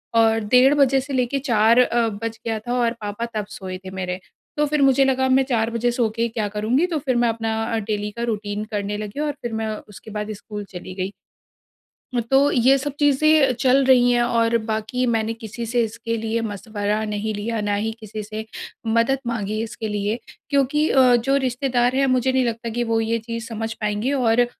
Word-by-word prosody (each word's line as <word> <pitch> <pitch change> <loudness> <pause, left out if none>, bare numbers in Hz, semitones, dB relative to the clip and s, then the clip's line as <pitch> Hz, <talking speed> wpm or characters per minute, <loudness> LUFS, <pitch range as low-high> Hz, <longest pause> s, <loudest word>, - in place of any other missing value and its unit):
और 225 0 +4
डेढ़ 260 +3 +7
बजे 275 -2 +4
से 275 +1 -7
लेके 255 +1 0
4 230 -3 +4
अ, 240 -2 +3
बज 225 +2 -5
गया 225 -1 -1
था 240 - 0
और 235 -1 +2
पापा 210 +2 -3
तब 210 -1 -1
सोए 190 -2 -6
थे 185 - -6
मेरे। 185 -1 -4 0.4
तो 295 - +3
फिर 295 0 0
मुझे 270 0 +5
लगा 260 0 +2
मैं 265 +1 +4
4 225 -2 +1
बजे 235 +1 0
सो 235 -2 +1
के 230 0 +1
क्या 220 -2 -2
करुँगी? 240 +10 +2
तो 325 -4 -1
फिर 260 -3 -1
मैं 240 -1 +3
अपना 225 0 -2 0.2
अ, - - +1
डेली 210 -1 -3
का 235 - -2
रूटीन 205 0 -4
करने 205 0 -2
लगी 210 +5 -6
और 300 0 0
फिर 235 -2 -4
मैं 220 -1 -2
उसके 210 +1 -13
बाद 210 0 -4
स्कूल 210 0 -7
चली 180 +1 -7
गई। 190 +1 -3 1.0
अ, - - +3
तो 275 +2 +5
ये 260 +2 +4
सब 275 +1 -4
चीज़ें 290 -1 +4
चल 265 +2 +4
रही 250 -2 +5
हैं 240 0 +3
और 230 -1 +2
बाकी 220 +3 -1
मैंने 225 0 0
किसी 230 +1 -7
से 240 +1 +1
इसके 230 +1 -3
लिए 225 +1 -1
मशवरा 210 0 -2
नहीं 210 +1 -2
लिया, 220 +2 -2
ना 205 0 0
ही 215 +2 -1
किसी 215 -1 -7
से 215 +1 -6 0.4
मदद 230 +4 +2
माँगी 215 -2 -2
इसके 225 -1 -5
लिए, 210 +1 -1 0.3
क्योंकि 285 +2 +2
अ, 255 -2 +5
जो 270 +4 +1
रिश्तेदार 250 -1 +1
हैं, 275 +1 +3
मुझे 255 0 +2
नहीं 260 -1 +2
लगता 230 0 -3
कि 240 +2 -1
वो 225 -1 +1
ये 225 +1 0
चीज़ 230 +1 -6
समझ 225 -1 -4
पाएँगे। 210 +3 -2
और 245 -3 +3
230 Hz, 210 wpm, -22 LUFS, 215-255 Hz, 1.0 s, डेढ़